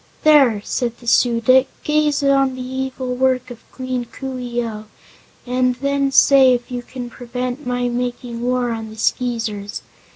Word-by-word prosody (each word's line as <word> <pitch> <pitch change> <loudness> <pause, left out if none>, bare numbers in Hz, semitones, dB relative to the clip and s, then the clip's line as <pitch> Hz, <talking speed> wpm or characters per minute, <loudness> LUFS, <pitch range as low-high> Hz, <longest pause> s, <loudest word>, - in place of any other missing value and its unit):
"There!" 270 -9 +5
said 240 -2 -2
the 240 - -16
Su 235 0 +3
dic, 260 +3 +5 0.2
"gaze 300 -1 +1
on 275 -1 +3
the 255 - -6
evil 260 0 -4
work 255 0 0
of 235 - -10
Queen 255 -2 -4
Coo 260 +2 -7
ee 240 -1 -2
oh, 215 -1 -7 0.6
and 250 0 +1
then 280 +1 0
say 270 -1 +6
if 245 +1 -7
you 245 -1 -3
can 245 0 -8
prevent 250 +2 -5
my 245 0 0
making 245 -1 -4
war 250 0 0
on 225 -1 -5
the 215 - -11
Skeezers. 220 -4 -2
250 Hz, 165 wpm, -20 LUFS, 240-260 Hz, 0.6 s, say